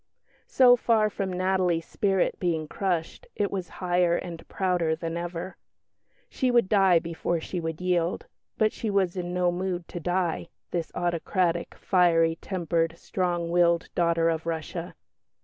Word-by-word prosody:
So 250 -2 +6
far 220 -3 +2
from 195 -2 -3
Natalie's 180 -2 +1
spirit 195 -2 0
being 165 -4 -1
crushed, 180 - -2
it 205 -1 0
was 190 -3 -4 0.2
higher 175 -1 +3
and 170 -2 -6
prouder 180 -4 0
than 165 0 -4
ever. 175 +1 -5 0.7
She 260 - -1
would 240 -5 +3
die 195 -4 +5
before 170 0 -2
she 180 +3 -4
would 160 -1 -4
yield; 180 - 0 0.3
but 215 -1 +2
she 225 - -3
was 195 -3 +1
in 175 -1 -3
no 180 0 +1
mood 180 -1 -3
to 175 - -5
die, 175 -1 -1 0.2
this 170 -2 -2
autocratic, 175 0 0
fiery 165 -3 +3
tempered, 165 -3 -1
strong 175 -2 -2
willed 170 -1 +3
daughter 170 -1 +2
of 165 0 -1
Russia. 165 +1 -4
175 Hz, 150 wpm, -27 LUFS, 170-190 Hz, 0.7 s, So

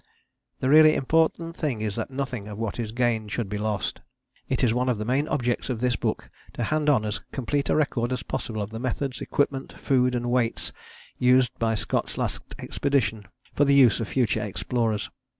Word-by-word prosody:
The 130 - +1
really 155 +1 +7
important 165 +3 +1
thing 135 -11 -2
is 105 -2 -2
that 115 - -3
nothing 130 -6 -4
of 105 -1 -7
what 115 +1 -3
is 110 -2 -3
gained 115 -3 0
should 115 -2 -2
be 105 +1 -4
lost. 105 -2 -2 0.5
It - - 0
is 115 -3 +4
one 125 +1 +1
of 120 - +1
the 105 - -4
main 135 +6 +1
objects 125 -5 -1
of 120 -4 -2
this 125 0 +1
book - - -3 0.2
to 120 - -3
hand 150 +4 +1
on 125 -7 +3
as 105 - -2
complete 140 +2 -1
a - - +3
record 130 -5 0
as 130 0 -2
possible 110 -2 -3
of 100 - -7
the 115 - -5
methods, 130 +1 -3
equipment, 140 -2 -1
food 125 -2 +1
and 120 0 -1
weights 120 -2 0 0.5
used 125 -1 +4
by 115 -1 +1
Scott's - - -1
Last - - -4
Expedition 115 -7 -1 0.3
for 145 - +3
the 140 0 +4
use 125 -7 +6
of 115 - -2
future 125 -2 +1
explorers. 110 +1 -1
125 Hz, 200 wpm, -25 LUFS, 110-135 Hz, 0.5 s, really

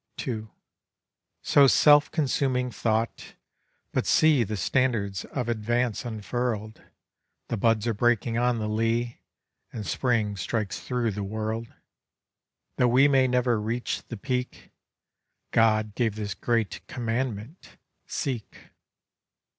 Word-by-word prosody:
2. 110 -3 -4 0.9
'So 140 -1 +6
self 145 +2 +6
consuming 130 -4 0
thought. 110 +1 -2 0.6
But - - 0
see 155 -6 +5
The 105 0 -4
standards 110 -5 0
of 125 -4 -4
Advance 120 +1 -1
unfurl'd; 110 -1 -3 0.7
The 115 - -1
buds 115 +1 +2
are 115 - +1
breaking 120 +1 +1
on 120 0 +2
the 110 -1 -2
lea, 115 +2 -1 0.5
And 110 -3 -6
Spring 110 -5 0
strikes 100 +2 -2
thro' 120 -3 -1
the 105 +1 -5
world. 110 +3 -4 1.1
Tho' 125 - +4
we 130 +4 +5
may 135 -2 +4
never 125 -3 +1
reach 115 +3 -2
the 115 - -6
Peak, 125 +2 -4 0.8
God 110 -2 +3
gave 115 -2 0
this 105 -2 -4
great 115 -3 -1
commandment, 120 - -4 0.3
Seek. 125 -6 -5
115 Hz, 115 wpm, -26 LUFS, 110-125 Hz, 1.1 s, So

